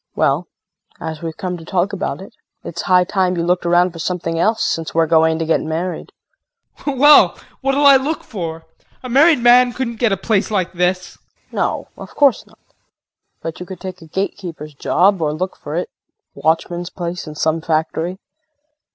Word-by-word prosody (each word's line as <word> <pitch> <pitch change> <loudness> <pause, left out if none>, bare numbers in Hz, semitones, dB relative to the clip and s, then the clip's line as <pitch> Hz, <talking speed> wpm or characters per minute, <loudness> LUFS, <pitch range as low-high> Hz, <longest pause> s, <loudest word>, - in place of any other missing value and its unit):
Well, - - +1 0.5
as 160 -1 -6
we've 165 -1 -5
come 180 -1 -4
to 165 - -11
talk 185 +4 -1
about 190 -1 -3
it, 195 - -12 0.3
it's 170 - -5
high 180 -1 +4
time 185 -1 0
you 170 - 0
looked 175 0 0
around 175 +1 +3
for 165 - -11
something 165 -1 -2
else, 220 +5 +2
since 165 -1 -2
we're 165 0 +4
going 160 0 +3
to 165 - -2
get 160 - +1
married. 165 +3 -4 0.7
JEAN. 285 -2 -2
Well, 290 +3 +7 0.2
what'll 270 +2 +1
I 280 -1 +9
look 285 +4 -3
for? 165 -5 -6 0.4
A 255 - -6
married 295 +5 +5
man 245 +1 +5
couldn't 235 -3 -4
get 235 -4 +2
a 195 - +1
place 200 +1 0
like 190 -4 -1
this. 180 0 -1
KRISTIN. - - -42 0.2
No, - - -1
of - - -10
course 280 -4 +3
not. - - -22 0.9
But 165 -1 -5
you 180 - -6
could 190 - -8
take 185 -2 -8
a 165 - -12
gatekeeper's 170 -4 -5
job 185 +6 +2
or 150 -1 0
look 185 +4 -3
for 150 - -7
a 180 - -1 0.5
watchman's 170 +2 -1
place 175 -1 -5
in 155 - -8
some 160 +1 0
factory. 160 +3 -1
180 Hz, 185 wpm, -18 LUFS, 165-205 Hz, 0.9 s, I